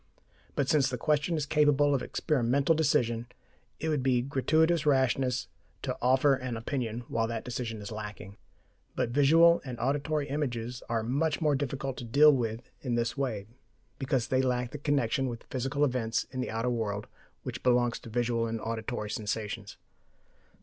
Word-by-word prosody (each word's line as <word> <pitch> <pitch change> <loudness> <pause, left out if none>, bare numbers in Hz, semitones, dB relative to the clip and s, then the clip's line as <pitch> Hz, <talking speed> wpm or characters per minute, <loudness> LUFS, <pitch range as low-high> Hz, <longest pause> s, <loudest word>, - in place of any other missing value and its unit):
But 140 - 0
since 140 -2 +3
the 125 - -3
question 150 +6 +1
is 150 - -1
capable 145 -1 +3
of 135 - +1
experimental 140 +1 +1
decision, 120 -7 +1 0.5
it 160 - -3
would 150 -3 +1
be 125 -2 +2
gratuitous 155 +5 +2
rashness 130 -3 +2 0.4
to - - -2
offer 130 +3 +4
an 130 -3 -3
opinion 115 -1 -3
while 115 -1 0
that 115 -1 -4
decision 120 -3 -4
is 100 - -7
lacking. 105 -2 -7 0.6
But - - 0
visual 165 +5 +5
and 125 -3 -7
auditory 145 +4 0
images 125 -4 -3
are 115 -1 0
much 145 +6 0
more 155 -3 +2
difficult 135 -1 -2
to - - -6
deal 145 +6 +6
with 115 -2 -2
in 125 -3 -1
this 120 0 0
way, 120 -8 -2 0.5
because 130 -3 0
they 130 0 +3
lack 125 -1 0
the 150 - -6
connection 140 -2 +1
with 115 -2 -6
physical 135 +3 0
events 120 -4 -1
in 130 0 -3
the - - -3
outer 115 +3 -1
world 105 -3 -2 0.4
which - - -5
belongs 120 -1 +2
to - - -11
visual 115 0 0
and 115 0 -3
auditory 110 -1 -4
sensations. 105 -1 -4
125 Hz, 165 wpm, -29 LUFS, 115-145 Hz, 0.6 s, deal